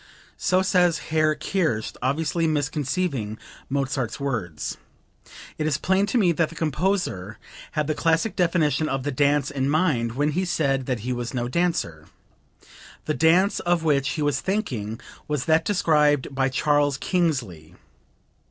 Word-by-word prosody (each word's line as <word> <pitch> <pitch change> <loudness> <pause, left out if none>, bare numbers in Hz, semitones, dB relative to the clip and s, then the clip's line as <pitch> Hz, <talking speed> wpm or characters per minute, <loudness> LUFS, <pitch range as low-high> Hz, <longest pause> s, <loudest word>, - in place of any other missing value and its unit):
[So 185 +1 +2
says 180 -3 +3 0.2
Herr 155 -1 +3
Kerst 155 - -1
obviously 160 +5 0
misconceiving 145 - -1 0.3
Mozart's 135 -2 -2
words. 115 - -3 0.8
It 155 - 0
is 150 -2 +1
plain 190 +5 +1
to 245 - 0
me 190 -6 +4
that 165 -1 +1
the 165 - -12
composer 155 - -1 0.4
had 150 -1 0
the 155 - 0
classic 165 +6 +1
definition 160 -4 +1
of 135 -1 -2
the 145 - -2
dance 145 +1 +2
in 135 -1 -1
mind 145 -8 +1
when 145 +3 +1
he 180 +5 0
said 135 -7 0
that 125 -5 -1
he 125 +3 -2
was 120 +1 -4
no 120 -1 -1
dancer. 125 - -1 1.0
The 155 - 0
dance 175 +6 +3
of 175 -1 +1
which 145 -3 +2
he 155 - -2
was 145 -2 0
thinking 125 - -2 0.3
was 150 -2 -2
that 160 0 +3
described 150 -8 +2
by 135 0 +1
Charles 145 +1 +2
Kingsley. 135 - -2
150 Hz, 150 wpm, -24 LUFS, 130-165 Hz, 1.0 s, me